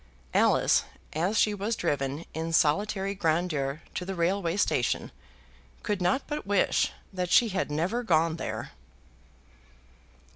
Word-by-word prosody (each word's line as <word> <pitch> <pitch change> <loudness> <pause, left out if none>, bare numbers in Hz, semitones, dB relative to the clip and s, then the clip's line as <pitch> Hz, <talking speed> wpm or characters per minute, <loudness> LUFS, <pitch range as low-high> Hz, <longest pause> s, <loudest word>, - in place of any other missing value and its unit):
Alice, - - +4 0.3
as 180 +7 0
she 210 - +3
was 205 +3 -2
driven 140 0 -2
in 165 +1 -3
solitary 195 +6 +2
grandeur 160 -5 -1
to - - -3
the 190 +1 -4
railway 175 +1 0
station, 125 -11 0 0.7
could 205 -3 -1
not 180 +10 +2
but 295 -9 -5
wish 200 -1 +2 0.2
that 180 -1 -2
she 230 +5 +5
had 190 - -1
never 175 +11 -1
gone 165 -6 +2
there. - - -5
180 Hz, 125 wpm, -28 LUFS, 160-200 Hz, 0.7 s, she